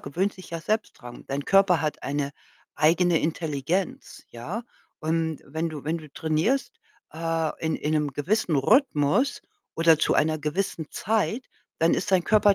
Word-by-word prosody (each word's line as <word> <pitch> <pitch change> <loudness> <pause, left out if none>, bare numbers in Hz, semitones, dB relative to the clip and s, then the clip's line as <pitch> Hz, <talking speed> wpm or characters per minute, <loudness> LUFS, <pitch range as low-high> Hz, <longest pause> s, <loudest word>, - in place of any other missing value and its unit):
gewöhnt 180 +8 -1
sich 185 - -12
ja 165 -1 -4
selbst 215 +6 -1
dran. 120 -2 -10
Dein 140 +1 -2
Körper 195 -3 +4
hat 155 -1 -2
eine 140 0 -2 0.4
eigene 165 +2 +3
Intelligenz, 160 +2 -2
ja? 155 - -5 0.4
Und 160 0 -1
wenn 160 +4 -2
du 150 -4 -8
wenn 160 +3 -1
du 155 -2 -12
trainierst, 160 - 0 0.4
äh, 165 -1 -1
in 160 - +1
in 150 +1 -2
'nem 150 -2 0
gewissen 160 +3 0
Rhythmus 215 - +3 0.4
oder 165 -1 +5
zu - - +2
einer 155 0 +2
gewissen 155 +1 -2
Zeit, 220 +4 0 0.3
dann 165 +1 +4
ist 195 - -2
dein 185 -2 +3
Körper 210 -1 +5
160 Hz, 160 wpm, -26 LUFS, 150-190 Hz, 0.4 s, oder